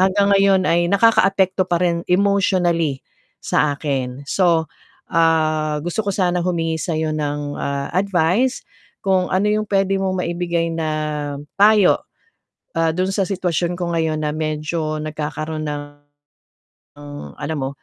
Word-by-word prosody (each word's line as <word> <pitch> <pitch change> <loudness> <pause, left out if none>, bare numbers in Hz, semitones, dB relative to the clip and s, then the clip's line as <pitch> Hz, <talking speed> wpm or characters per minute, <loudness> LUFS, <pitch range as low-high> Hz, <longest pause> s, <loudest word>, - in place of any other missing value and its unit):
hanggang 200 +2 +3
ngayon 195 -1 +4
ay 170 0 +2
nakakaapekto 195 -2 +3
pa 175 - +2
rin 170 -1 +1
emotionally, 180 -6 +1 0.3
sa 150 - +1
akin. 135 -2 -3
So, 170 -1 +2 0.5
ah, 155 -2 +2
gusto 175 +5 -1
ko 200 - -2
sanang 180 -2 0
humingi 165 -2 -1
sa 165 -3 -2
'yo 155 -1 -1
ng, 145 -1 -3
ah, 140 0 -3
advice 195 +6 +1 0.4
kung 190 -2 +1
ano 190 +3 +1
'yong 210 +1 +2
puwede 195 -1 +1
mong 190 -1 -1
maibigay 170 -1 -1
na 160 -1 -2 0.7
payo. 205 -1 +5 0.8
Ah, 165 -1 +2
do'n 185 +1 0
sa 195 0 0
sitwasyon 180 -2 -1
ko 175 -1 -3
ngayon 160 -2 0
na 150 - 0
medyo 155 +1 -2
nagkakaroon 155 0 -4
ng, 145 0 -3 1.6
alam 155 +1 -3
mo, 135 0 -2
170 Hz, 135 wpm, -20 LUFS, 155-190 Hz, 1.6 s, payo